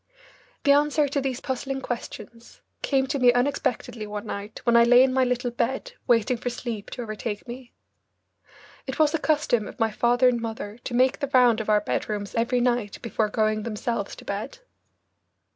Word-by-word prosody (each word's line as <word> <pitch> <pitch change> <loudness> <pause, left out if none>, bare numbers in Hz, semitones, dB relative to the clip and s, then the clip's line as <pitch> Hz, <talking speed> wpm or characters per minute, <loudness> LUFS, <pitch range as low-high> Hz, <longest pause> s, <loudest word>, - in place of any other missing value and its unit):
The 280 - +5
answer 295 +1 +3
to 280 0 -1
these 260 -2 -3
puzzling 270 0 -3
questions 235 -2 -7 0.2
came 270 -2 +1
to 280 +1 -2
me 250 -1 +6
unexpectedly 245 -3 -1
one 210 +1 -5
night 205 0 -6
when 235 -1 +3
I 235 - +7
lay 245 +2 +7
in 260 -1 +2
my 260 0 +3
little 245 -1 -1
bed 260 - -2 0.2
waiting 235 +1 +3
for 245 - -3
sleep 235 -3 -5
to 245 - -6
overtake 215 -1 -5
me. 240 0 -9 1.1
It 265 - -4
was 305 -1 +3
a 325 - +1
custom 295 -9 +1
of - - -11
my 225 -1 +2
father 240 +3 +3
and 240 -2 +2
mother 225 -1 -6
to 240 - -3
make 255 +2 +3
the 280 -2 -2
round 240 -3 +5
of 220 - -5
our 210 -1 +4
bedrooms 205 -1 -3
every 235 +2 +1
night 240 -4 0
before 220 -2 0
going 215 0 +1
themselves 230 +2 -3
to - - -13
bed. - - -4
240 Hz, 185 wpm, -25 LUFS, 220-260 Hz, 1.1 s, I